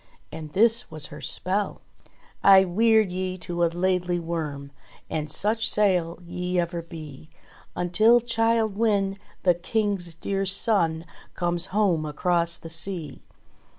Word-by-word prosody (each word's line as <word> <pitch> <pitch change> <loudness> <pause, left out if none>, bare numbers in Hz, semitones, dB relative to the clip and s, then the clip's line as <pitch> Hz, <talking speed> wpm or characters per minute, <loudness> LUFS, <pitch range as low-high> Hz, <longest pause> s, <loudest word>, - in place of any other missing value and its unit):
And 155 -1 -8
this 225 +3 +3
was 155 -2 -3
her - - -9
spell: 195 +2 -2 0.6
"I 195 -1 +8
weird 220 +2 +3
ye 185 0 -3
to 175 -1 -3
a - - +5
Laidly 180 +1 0
Worm, 155 -4 -4 0.4
And 155 -1 -2
such 220 +8 +1
sail 180 -5 +1
ye 180 +1 -2
ever 170 0 -2
be 155 -3 -10 0.5
Until 215 +7 +4
Childe 225 -2 +1
Wynde, 200 -3 +1 0.2
the 180 - +5
King's 185 -2 -2
dear 195 +3 -2
son, 180 -5 +1 0.3
Comes 175 0 -2
home 185 -6 +1
across 170 +2 0
the - - -11
sea. 165 -2 -3
180 Hz, 130 wpm, -25 LUFS, 165-205 Hz, 0.6 s, I